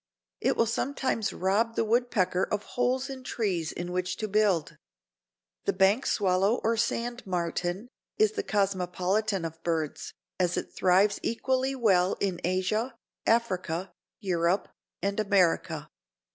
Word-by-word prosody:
It - - +1
will 230 - +4
sometimes 235 -1 -1
rob 215 +5 +1
the - - +2
woodpecker 215 -6 +1
of 205 0 -1
holes 255 +2 0
in 265 -2 -7
trees 185 -10 -1
in 175 +1 -5
which 180 0 -2
to 215 - -2
build. 205 -6 +1 0.9
The 400 - +2
bank 200 - +3
swallow 195 +3 +2
or 230 +1 +2
sand 235 +2 -1
martin 175 +3 -2 0.3
is 430 0 +4
the 430 -1 -2
cosmopolitan 195 - 0
of 165 0 -7
birds, 160 -3 -2 0.2
as 180 -1 +1
it - - -4
thrives 190 +3 +3
equally 260 +3 0
well 195 -7 +3
in 185 -3 -1
Asia, 190 +7 0 0.3
Africa, 190 -6 0 0.3
Europe 180 0 0 0.3
and 200 +1 0
America. 180 -6 +2
200 Hz, 130 wpm, -28 LUFS, 180-230 Hz, 0.9 s, will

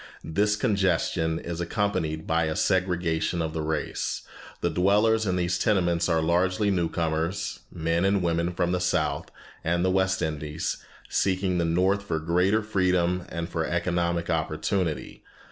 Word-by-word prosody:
This 105 +6 +1
congestion 95 - +1
is 85 0 -5
accompanied 85 -4 -1
by 80 0 +1
a 80 0 -2
segregation 90 -3 +1
of 80 -1 -2
the 80 - -2
race. 75 -1 -2 0.4
The - - +1
dwellers 105 +4 +3
in 90 - +1
these 90 -1 0
tenements 85 -4 +2
are 80 -1 +2
largely 90 +5 +2
new 85 -3 +1
comers, 80 +3 -2
men 85 +1 0
and 95 -1 +2
women 85 0 +1
from 90 0 0
the 90 - +1
South 90 -4 0 0.3
and 85 +2 +1
the 95 - +3
West 95 0 +1
Indies, 75 0 -2 0.3
seeking 95 -1 +1
the 85 - +1
North 95 +4 +2
for 100 -5 -2
greater 90 +7 +2
freedom 90 -3 +1
and 85 0 -4
for - - -2
economic 85 -1 0
opportunity. 80 +1 -2
85 Hz, 150 wpm, -26 LUFS, 80-95 Hz, 0.4 s, dwellers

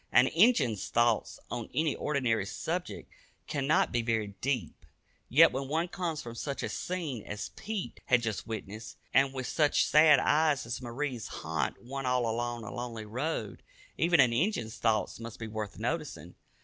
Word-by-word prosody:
An 125 - +6
"Injun's" 160 - +3
thoughts 120 -1 +1
on 120 -2 -4
any 155 -1 +1
ordinary 120 -9 0
subject 175 - -4 0.4
cannot 145 0 +2
be 120 - +1
very 110 -3 -1
deep, 125 - -2 0.5
yet 165 +6 +7
when 135 +1 -3
one 160 +5 0
comes 165 -5 -3
from 115 - -7
such 140 +4 -4
a - - -2
scene 165 -10 -3
as 105 +1 -5
Pete 210 -3 -5
had 125 -1 +3
just 110 -1 -3
witnessed, 110 0 -6 0.2
and 135 0 +4
when 130 -1 -4
such 150 +1 +2
sad 150 -1 +7
eyes 150 -1 +2
as 115 +2 -4
Marie's 125 0 -4
haunt 80 - -3
one 135 +1 -4
all 125 -2 +2
along 120 +1 -2
a 105 - -7
lonely 120 -3 -5
road, 115 - -3 0.3
even 175 +1 +3
an 125 -3 +6
"Injun's" 120 - 0
thoughts 110 -2 0
must 115 -1 -8
be 110 - -6
worth 110 -2 -5
noticing. 115 - -3
125 Hz, 165 wpm, -30 LUFS, 115-150 Hz, 0.5 s, yet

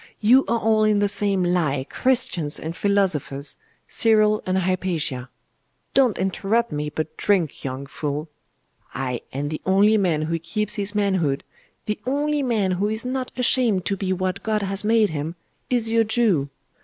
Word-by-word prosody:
You 250 +5 +5
are 235 - +1
all 220 -1 +2
in 215 -1 +3
the 205 0 +2
same 200 -2 0
lie, 155 -7 0
Christians 185 - +1
and 160 +2 -5
philosophers, 180 -9 0 0.3
Cyril 215 -1 +3
and 185 0 +1
Hypatia! 175 -8 -1 0.6
Don't 260 -6 +3
interrupt 200 +5 0
me, 150 0 -2
but 155 +1 -4
drink, 185 -8 0
young 135 +1 -4
fool! 150 +2 -4 0.7
Ay, 125 -2 -3
and 145 +2 -3
the 155 - -4
only 200 +3 +4
man 165 -6 +1
who 165 +1 -2
keeps 210 +6 -2
his 205 -1 -3
manhood, 185 -9 +1 0.4
the 210 - -2
only 290 +2 0
man 220 -8 +1
who 190 +3 0
is 220 +2 -3
not 255 0 -3
ashamed 235 -7 +2
to 200 - 0
be 190 -1 -3
what 185 +1 -2
God 215 -2 -1
has 195 +1 +1
made 220 -2 +3
him, 155 +2 -4 0.3
is 240 -3 +1
your 225 0 +3
Jew. 215 - +1
195 Hz, 165 wpm, -23 LUFS, 160-220 Hz, 0.7 s, You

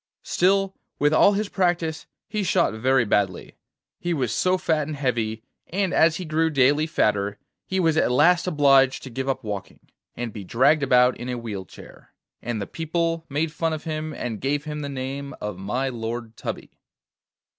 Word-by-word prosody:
Still, 195 +1 +2 0.2
with 145 +1 +2
all 200 - +6
his 210 +1 -1
practice 175 -5 -1 0.2
he 215 - -2
shot 185 - +2
very 130 +3 +2
badly, 100 -3 0 0.4
he 175 -1 -1
was 125 -6 -1
so 185 +9 +2
fat 155 -5 0
and 155 - -4
heavy, 115 -5 -1 0.2
and 190 0 -1
as 160 0 +4
he 180 - -5
grew 160 +1 +1
daily 145 +2 +3
fatter, 105 -8 0 0.3
he 190 - -1
was 165 -3 +3
at 140 - +3
last 175 +8 +4
obliged 135 -5 +4
to 130 - -8
give 130 +3 -3
up 130 -1 -2
walking, 100 -2 -7 0.2
and 120 -3 -4
be 105 - -7
dragged 130 - +3
about 125 -2 +4
in 120 +1 -6
a 125 - -2
wheel 105 -5 -5
chair, - - -15 0.3
and 120 -2 -3
the 100 - -3
people 165 - -2
made 150 +3 -1
fun 165 0 -1
of 155 - -5
him, 155 -1 -3
and 120 -7 -5
gave 145 +2 0
him 150 -1 -5
the 145 -1 -4
name 135 +1 -5
of 105 -3 -5
my 120 +8 -1
Lord 115 -2 -5
Tubby. - - -6
140 Hz, 185 wpm, -24 LUFS, 120-165 Hz, 0.4 s, all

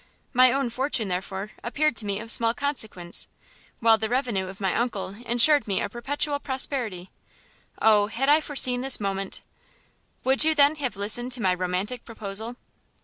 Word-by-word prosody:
My 255 0 +6
own 270 -2 -1
fortune, 250 -4 0
therefore, 190 +3 -4
appeared 295 +3 0
to 210 - -3
me 200 0 -2
of 225 +1 +2
small 230 0 +4
consequence, 220 -11 -2 0.5
while 225 -1 +5
the 220 0 -2
revenue 240 -7 -1
of 190 +1 -10
my 190 -3 -1
uncle 230 -5 -2 0.2
insured 245 +5 +5
me 200 0 -1
perpetual 285 +6 -3
prosperity. 255 -9 -4 0.7
Oh 210 -2 +4
had 235 +5 -2
I 300 +2 +5
foreseen 255 -4 +2
this 265 0 +3
moment 195 -1 -4 0.4
" - - -40
"Would 265 +2 +4
you, 315 0 +3
then, 290 +1 +4
have 265 -6 -3
listened 240 +5 0
to 245 - -2
my 185 - +3
romantic 185 +6 -3
proposal?" 220 +1 -5
230 Hz, 165 wpm, -25 LUFS, 200-265 Hz, 0.7 s, My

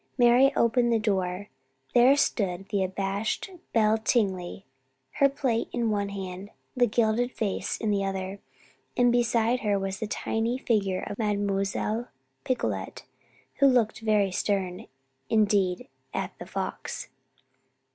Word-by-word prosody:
Mary 245 +2 +6
opened 235 +1 +3
the 230 - +4
door. 195 -2 -1 0.5
There 250 +3 +6
stood 195 -8 0
the 200 -2 +1
abashed 195 - -2 0.2
Belle 220 -1 +3
Tingley, 195 -5 0 0.5
her 275 - +6
plate 255 -4 -1
in 235 -2 0
one 200 -1 -1
hand, 195 0 -6 0.3
the 245 -1 +4
gilded 230 +2 +1
vase 205 -3 -2
in 220 -2 -1
the 200 -1 +1
other, 195 0 -3 0.6
and 245 -1 +5
beside 240 0 +2
her 205 -3 +1
was 195 0 -3
the 220 - -3
tiny 225 +3 -1
figure 200 -7 0
of 205 +1 -6
Mademoiselle 205 +2 -1 0.4
Picolet, 255 - -2 0.5
who 280 - +6
looked 245 -5 +2
very 210 -3 +2
stern 185 -1 -2 0.4
indeed 200 -4 +2 0.3
at - - -2
The - - -8
Fox. - - -5
210 Hz, 130 wpm, -27 LUFS, 195-235 Hz, 0.6 s, Mary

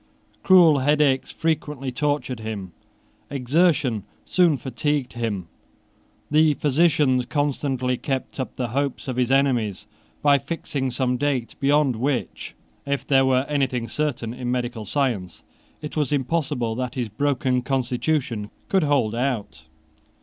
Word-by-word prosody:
Cruel 175 -6 +6
headaches 145 -1 +2
frequently 150 -4 -2
tortured 145 -2 -1
him. 105 -4 -5 0.6
Exertion 140 - +2 0.2
soon 175 -5 +3
fatigued 130 +2 -2
him. 110 -6 -3 0.9
The 155 0 +4
physicians 145 -4 +2
constantly 135 -3 0
kept 135 0 -4
up 130 - -4
the 125 -2 -2
hopes 140 +3 -2
of 130 - -2
his 125 0 +1
enemies 120 -8 +1 0.4
by 145 -1 +5
fixing 140 -2 -3
some 125 0 0
date 130 -3 -1
beyond 140 -2 +3
which, 125 - -2 0.3
if 140 -1 -2
there 135 -1 +4
were 130 0 +2
anything 130 -5 0
certain 120 -3 -2
in 125 -1 -5
medical 120 -3 -2
science, 110 - -2 0.4
it 150 - -6
was 150 -4 0
impossible 140 -4 0
that 125 +1 -4
his 120 -4 -2
broken 130 +1 0
constitution 125 -3 -1 0.2
could 190 - +3
hold 140 -8 +2
out. 120 - -3
130 Hz, 130 wpm, -23 LUFS, 120-145 Hz, 0.9 s, Cruel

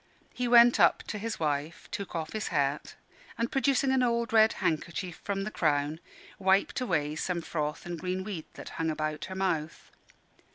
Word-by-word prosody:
He 250 -1 -2
went 240 0 +7
up - - +5
to 210 - -5
his 225 +1 -4
wife, 150 +3 -2
took 200 -4 -5
off 160 -1 -3
his 215 -1 -2
hat, 145 -3 -1 0.4
and 230 +1 -1
producing 270 0 +2
an 265 -1 +3
old 235 -2 0
red 220 0 +6
handkerchief 170 +2 -2
from 195 -1 -2
the 215 - -4
crown, 150 -2 0 0.4
wiped 190 +5 +2
away 150 -10 0
some 170 +2 -2
froth 150 -1 -3
and 175 -1 -5
green 185 +1 -2
weed 185 -6 -5
that - - -8
hung 165 0 +1
about 155 -1 -2
her 190 - -7
mouth. 165 -5 -2
185 Hz, 175 wpm, -29 LUFS, 155-220 Hz, 0.4 s, went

